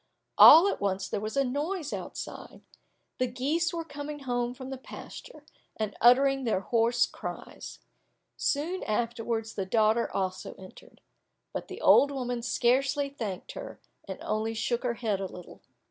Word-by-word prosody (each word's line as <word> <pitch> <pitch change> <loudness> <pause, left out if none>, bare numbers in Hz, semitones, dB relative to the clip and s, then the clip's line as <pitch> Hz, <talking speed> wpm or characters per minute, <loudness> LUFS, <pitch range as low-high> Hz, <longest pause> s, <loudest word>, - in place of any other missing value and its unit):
All 335 +5 +10
at - - -2
once 195 -1 -1
there - - -2
was 215 +5 -5
a 275 - +4
noise 295 +5 -3
outside, - - -7 0.6
the 255 - +2
geese 285 +8 -1
were 335 -2 -4
coming 290 -1 -7
home 245 -2 -2
from 260 0 -8
the 265 - -4
pasture, - - -11 0.3
and 215 -2 -3
uttering 270 +3 +5
their 220 -6 0
hoarse 235 +3 +2
cries. - - -8 0.6
Soon 330 +6 -1
afterwards 225 0 -2
the 190 -2 -4
daughter 220 +2 +2
also 190 -1 -3
entered. 190 -1 -15 0.5
But - - -5
the - - -9
old 285 - +6
woman 245 -3 -3
scarcely 270 +4 +1
thanked 215 -9 -6
her, - - -8 0.3
and - - -5
only 220 +1 -2
shook 235 +2 -1
her 245 -2 -1
head 220 -4 -1
a 195 - -3
little. 180 -1 -12
245 Hz, 155 wpm, -28 LUFS, 220-280 Hz, 0.6 s, All